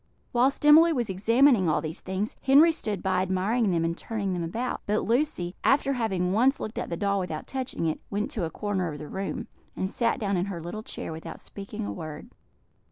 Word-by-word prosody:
Whilst 260 +4 +2
Emily 320 +3 +8
was 240 -9 0
examining 225 - +4
all 155 - +2
these 160 0 -5
things, 190 +3 -3
Henry 285 +5 +6
stood 210 - -3
by 185 -1 +1
admiring 190 +5 +1
them 165 -2 +1
and 165 0 -1
turning 200 -1 -3
them 175 -1 -2
about; 230 +10 -3
but 210 +1 +1
Lucy, 230 -8 0
after 275 0 +3
having 190 -7 0
once 255 +6 +3
looked 215 - -4
at - - -4
the 170 - -3
doll 200 +1 +1
without 165 -4 -4
touching 260 -9 -3
it, 160 - -1
went 210 +1 -2
to 205 - -3
a 165 - -1
corner 190 -1 -2
of 150 - -7
the 150 +1 -8
room, 195 +4 -4 0.3
and 190 +1 -2
sat 235 - 0
down 200 -3 0
in 175 - 0
her 195 -4 -5
little 175 +6 -6
chair 215 - -6
without 160 +1 -7
speaking 205 +2 -7
a - - -4
word. 155 -4 -8
200 Hz, 215 wpm, -27 LUFS, 180-235 Hz, 0.3 s, Emily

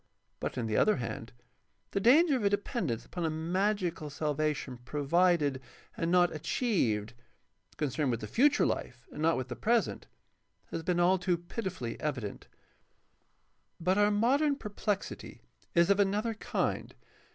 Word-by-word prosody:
But, - - -4
on 120 - -1
the 110 -1 0
other 215 - +4
hand, 115 -2 -5 0.6
the - - 0
danger 285 - +5
of 245 - -1
a 200 - +4
dependence 200 - -2
upon 175 - -5
a 160 - +1
magical 175 0 -1
salvation 150 -3 -2
pro 145 +3 -4
vided 170 -4 +3 0.4
and 165 - -1
not 175 0 +4
achieved, 145 - 0 0.6
concerned 145 -1 0
with 115 -2 -1
the - - -4
future 285 +5 +3
life 120 -1 -3
and - - -7
not 165 +1 +3
with 130 - -3
the - - -5
present, 235 +1 0 0.6
has 165 - -3
been 175 +1 0
all 180 +2 +4
too 180 -1 +1
pitifully 175 - -5
evident. 125 -9 -4 1.3
But 185 +4 +2
our 205 0 +5
modem 270 +8 +3
perplexity 205 -4 -4 0.3
is 170 +3 +5
of 200 - +3
another 205 +3 +1
kind. 220 - -2
175 Hz, 150 wpm, -31 LUFS, 145-205 Hz, 1.3 s, danger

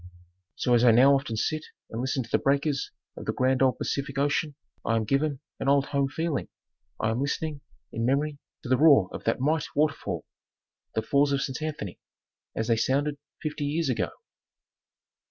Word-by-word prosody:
So 125 - +1
as 120 0 +5
I 125 - +7
now 125 +5 +7
often 135 -4 0
sit 155 +7 -1 0.3
and 115 - -3
listen 130 0 -1
to - - -14
the - - +3
breakers 140 0 +1 0.3
of - - -8
the - - 0
grand 130 +1 +2
old 130 -1 +3
Pacific 140 0 -3
Ocean, 145 +1 +1 0.3
I 115 - +1
am 110 - +1
given 140 +4 0 0.2
an 135 - 0
old 140 0 +4
home 140 -1 0
feeling, 160 +1 -2 0.5
I 110 - +1
am 115 +3 -1
listening, 145 +1 -2 0.3
in 115 - -3
memory, 140 +4 +1 0.2
to - - -7
the 130 - +4
roar 140 - +6
of - - -7
that 115 - +1
might 150 +3 +1
water 150 0 +3
fall, - - -5 0.7
the 110 - 0
Falls 140 +4 +3
of 140 - +1
St. 130 0 -4
Anthony, 145 - -4 0.6
as 110 - -1
they 115 -2 +3
sounded 140 +5 0 0.2
fifty 150 -1 -3
years 155 +1 0
ago. 125 - 0
140 Hz, 190 wpm, -27 LUFS, 125-145 Hz, 0.7 s, I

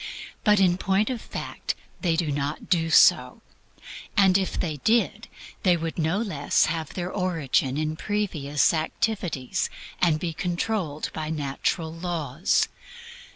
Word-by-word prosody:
But 210 -1 +5
in 180 -1 +3
point 195 +6 +1
of 240 -3 -4
fact - - -5 0.3
they 170 -4 +2
do 160 -3 0
not 145 +1 -3
do 165 -3 +2
so; 155 - +5 0.7
and 190 -2 +5
if 190 -1 +1
they 155 -5 -2
did, 225 - +1 0.3
they 180 -2 +4
would 165 +1 -4
no 160 +4 +1
less 190 -10 +1
have 160 -2 -3
their 180 0 -3
origin 155 -8 0
in 155 0 -1
previous 160 -8 0
activities 160 - -1 0.3
and 160 -3 +3
be 165 0 -3
controlled 175 -2 -2
by 155 -1 -4
natural 160 +2 -2
laws. 165 -2 0
165 Hz, 135 wpm, -25 LUFS, 155-190 Hz, 0.7 s, But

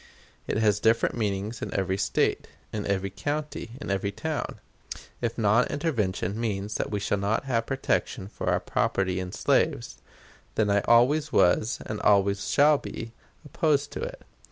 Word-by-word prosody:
It - - -1
has 105 -2 +3
different 115 +2 +3
meanings 105 0 -2
in - - -4
every 95 0 0
State, 100 - +1 0.3
in 105 -1 -3
every 100 -1 -1
county, 145 +1 -4
in 145 - -4
every 100 +1 -1
town. 155 +8 -4 0.6
If 115 -2 -2
non 115 +2 +3
intervention 105 - -1
means 105 -2 -2
that - - -2
we 105 - -2
shall 100 0 0
not 100 +2 0
have 115 -4 0
protection 130 -5 -1
for - - -4
our - - +2
property 95 -1 0
in 90 -1 -5
slaves, - - 0 0.6
then 105 -2 +2
I 100 0 +3
always 145 +6 +4
was, 110 +6 +3
and 110 -1 -4
always 100 -1 +3
shall 145 0 +5
be, 115 0 -7 0.3
opposed 145 -1 +1
to - - -5
it. - - -6
110 Hz, 160 wpm, -27 LUFS, 100-130 Hz, 0.6 s, shall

